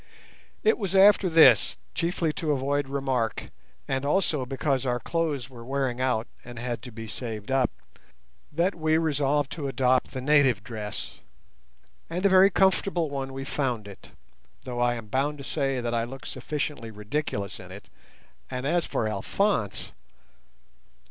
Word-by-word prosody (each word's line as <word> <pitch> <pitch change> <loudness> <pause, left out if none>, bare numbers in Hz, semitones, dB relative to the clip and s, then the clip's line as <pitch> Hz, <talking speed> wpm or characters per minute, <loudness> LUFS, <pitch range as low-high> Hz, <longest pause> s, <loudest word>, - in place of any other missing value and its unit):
It 440 - +3
was 195 -3 -2
after 195 -1 +6
this, 145 -10 +6 0.2
chiefly 165 -1 0
to 155 -1 -1
avoid 140 0 0
remark, 130 -5 -1 0.4
and 135 0 -1
also 150 -4 +1
because 135 0 0
our 125 -2 0
clothes 150 -2 -1
were 120 -3 -11
wearing 130 -1 -1
out 125 -3 +1 0.2
and 120 0 -10
had 120 -1 -3
to 125 - -9
be 115 0 -8
saved 110 0 -6
up, 135 -1 +3 0.8
that 170 +5 +1
we 160 -1 +1
resolved 145 -3 +1
to 150 -4 -4
adopt 130 -1 +2
the 130 - -3
native 135 -6 +4
dress; 105 -2 -6 0.9
and 180 +4 -2
a - - +7
very 190 +1 +7
comfortable 190 -4 +2
one 135 -1 -3
we 135 0 -6
found 125 -7 -2
it, 100 - -12 0.5
though 125 -2 -5
I 120 0 +2
am 115 -2 -7
bound 135 +7 -1
to 140 - -8
say 135 -2 -1
that 120 -1 -2
I 115 -1 +1
looked 130 +3 -7
sufficiently 140 -2 -4
ridiculous 105 -1 -3
in 90 0 -11
it, 100 +2 -11 0.6
and 125 +1 -4
as 170 +3 +2
for 110 - -1
Alphonse! 110 - -1
135 Hz, 155 wpm, -27 LUFS, 120-155 Hz, 0.9 s, a